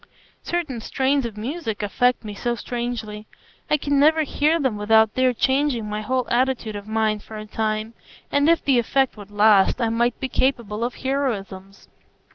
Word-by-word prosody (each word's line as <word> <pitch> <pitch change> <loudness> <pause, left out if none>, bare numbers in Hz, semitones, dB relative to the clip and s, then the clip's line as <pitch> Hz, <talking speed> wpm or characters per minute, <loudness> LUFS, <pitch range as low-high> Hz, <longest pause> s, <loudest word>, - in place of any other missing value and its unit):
Certain 310 -9 -3
strains 270 +2 0
of 215 -2 -11
music 225 -2 -4
affect 245 +3 +1
me 210 - -5
so 240 +4 -2
strangely; 235 -3 -5 0.4
I 300 - +3
can 285 -1 0
never 315 +2 +4
hear 305 +3 +1
them 260 -7 0
without 220 +1 +3
their 255 0 +3
changing 265 -2 0
my 210 0 -3
whole 255 +3 -1
attitude 240 -3 0
of 205 0 -7
mind 215 -1 0
for 220 - -10
a 215 - -7
time, 215 +1 -2 0.4
and 285 +2 +3
if 335 - +2
the 265 -3 +4
effect 265 +3 +1
would 205 -2 -11
last, 205 0 +4
I 230 -2 +1
might 235 +1 0
be 265 - -2
capable 235 -5 -1
of 240 +1 -2
heroisms." 200 -8 -3
235 Hz, 175 wpm, -22 LUFS, 215-265 Hz, 0.4 s, never